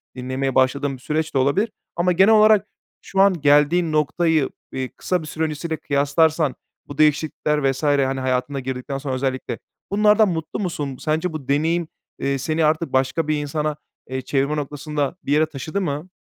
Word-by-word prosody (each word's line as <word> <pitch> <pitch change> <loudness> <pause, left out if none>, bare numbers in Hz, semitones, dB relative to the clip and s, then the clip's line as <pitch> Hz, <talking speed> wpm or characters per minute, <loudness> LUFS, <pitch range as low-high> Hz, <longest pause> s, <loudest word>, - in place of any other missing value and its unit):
dinlemeye 130 +1 -3
başladığın 135 +2 +2
bir 130 - -10
süreç 155 +3 -2
de - - +1
olabilir 165 - +2 0.2
ama 175 +1 +2
genel 190 +5 +5
olarak 215 -1 +5 0.3
şu 195 - 0
an 190 -5 +4
geldiğin 150 +4 +4
noktayı, 155 0 +1 0.2
eee, 130 -1 -3
kısa 180 -2 -1
bir 155 - -8
süre 160 +1 -3
öncesiyle 160 +1 -3
kıyaslarsan 150 +1 +1 0.3
bu 145 - -9
değişiklikler 150 -1 +2
vs. 135 +3 -7
hani, 135 -2 +2
hayatına 130 +1 -1
girdikten 130 +1 -4
sonra 135 -1 -3
özellikle 130 0 -3 0.3
bunlardan 210 +1 +4
mutlu 160 0 -4
musun? 150 -9 -3
Sence 160 +2 -1
bu 145 -4 -7
deneyim, 160 +4 +1 0.3
eee, 140 0 0
seni 155 +4 0
artık 155 +2 0
başka 135 +4 +1
bir 155 - +1
insana, 150 +1 -2 0.3
eee, 130 0 -3
çevirme 140 +3 0
noktasında 150 +1 -3
bir - - -3
yere 155 +1 +4
taşıdı 155 +5 -4
mı? 150 0 -3
150 Hz, 170 wpm, -22 LUFS, 135-165 Hz, 0.3 s, genel